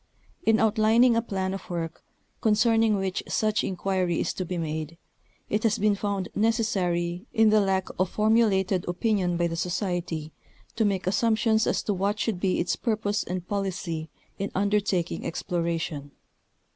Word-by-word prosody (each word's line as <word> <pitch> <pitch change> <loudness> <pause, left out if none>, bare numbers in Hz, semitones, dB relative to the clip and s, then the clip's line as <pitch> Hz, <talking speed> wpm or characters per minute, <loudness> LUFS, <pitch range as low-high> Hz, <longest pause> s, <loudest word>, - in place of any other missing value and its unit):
In 225 0 +5
outlining 225 +2 +4
a 230 - +3
plan 190 -4 -2
of 195 - -7
work, 170 -2 -4 0.4
concerning 220 0 +3
which 190 -2 -1
such 215 +1 +1
inquiry 185 -2 -1
is - - -1
to 185 - -3
be 180 0 -4
made, 160 0 -4 0.5
it 210 - 0
has 220 -2 +2
been 210 +1 +3
found 200 -2 -2
necessary, 190 -4 0
in 220 -1 +5
the 215 0 +5
lack 190 -1 0
of 185 0 +1
formu 220 +1 +3
lated 190 -1 0
opinion 180 -1 0
by 175 - +1
the 165 -1 -2
Society, 175 -3 -2 0.4
to 225 -1 +2
make 195 -2 0
assumptions 220 +2 +2
as - - 0
to 210 - 0
what 200 +3 -1
should 215 -6 -1
be 185 0 +1
its 175 - 0
purpose 210 -3 -1
and 180 0 -5
policy 185 -5 -3 0.3
in 195 - -2
undertaking 200 -3 0
exploration. 165 -4 -3
195 Hz, 160 wpm, -26 LUFS, 175-215 Hz, 0.5 s, In